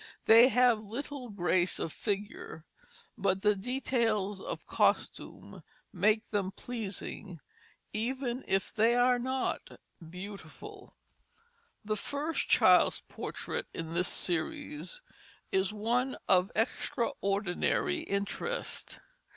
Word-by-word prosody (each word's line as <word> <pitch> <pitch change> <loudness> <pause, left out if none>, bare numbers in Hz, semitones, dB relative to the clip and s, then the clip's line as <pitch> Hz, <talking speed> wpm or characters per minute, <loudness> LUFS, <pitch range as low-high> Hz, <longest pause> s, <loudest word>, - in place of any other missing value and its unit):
They 230 +2 +9
have 250 -3 +4
little 250 +4 -6
grace 185 -2 +1
of 160 - -3
figure, 200 -5 -4 0.5
but 195 0 +1
the 210 -1 +4
details 215 -3 0
of - - -6
costume - - -1 0.3
make 215 +4 +2
them 200 -3 0
pleasing 200 -5 -6 0.5
even 250 +3 -2
if 195 -1 0
they 230 +2 +4
are 245 0 +4
not 260 +2 -2 0.4
beautiful. 200 - -10 0.9
The 215 0 0
first 295 +7 -2
child's - - +5
portrait - - -5
in 165 0 -5
this 180 +2 +1
series 295 - -1 0.5
is 190 +1 +2
one 240 +5 0
of 185 0 +4
extraordinary 200 - 0
interest. 200 - -3
215 Hz, 100 wpm, -31 LUFS, 190-250 Hz, 0.9 s, They